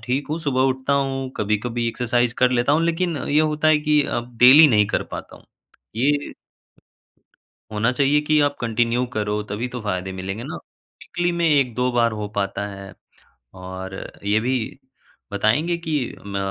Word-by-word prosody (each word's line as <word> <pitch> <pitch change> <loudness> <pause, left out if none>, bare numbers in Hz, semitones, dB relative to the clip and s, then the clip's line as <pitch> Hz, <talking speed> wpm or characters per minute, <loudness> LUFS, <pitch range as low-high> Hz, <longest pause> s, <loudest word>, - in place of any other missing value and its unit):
ठीक 125 +5 -2
हूँ, 155 - -1
सुबह 140 -5 0
उठता 130 +1 -2
हूँ, 135 -1 -1
कभी-कभी 115 +3 -1
एक्सरसाइज़ 120 0 0
कर 125 -1 +4
लेता 125 +2 +2
हूँ, 155 +2 +3
लेकिन 170 0 0
ये 145 +2 +1
होता 155 0 +1
है 155 - +5
कि 150 -1 +3 0.2
अब 120 0 -9
डेली 135 +6 +9
नहीं 105 -4 +4
कर - - -1
पाता - - -8
हूँ। - - -20 0.5
ये 145 +4 0 1.4
होना 110 +3 +1
चाहिए 140 +3 +2
कि 155 0 +4
आप 145 0 +1
कन्टिन्यू 120 +1 0
करो, 105 0 -1
तभी 105 +4 -4
तो 125 - -5
फ़ायदे 95 -2 -3
मिलेंगे 95 +4 -5
ना। - - -6 0.5
वीकली 175 0 -2
में 170 0 0
1-2 125 -3 +1
बार 120 -1 +2
हो 105 - -3
पाता 100 0 -2
है 100 -1 -9 0.6
और 95 +1 -7 0.3
ये 105 +2 +2
भी 125 +4 0 0.8
बताएँगे 130 +12 +1
कि 155 - +1 0.3
म 100 -1 -4
125 Hz, 165 wpm, -22 LUFS, 105-145 Hz, 1.4 s, डेली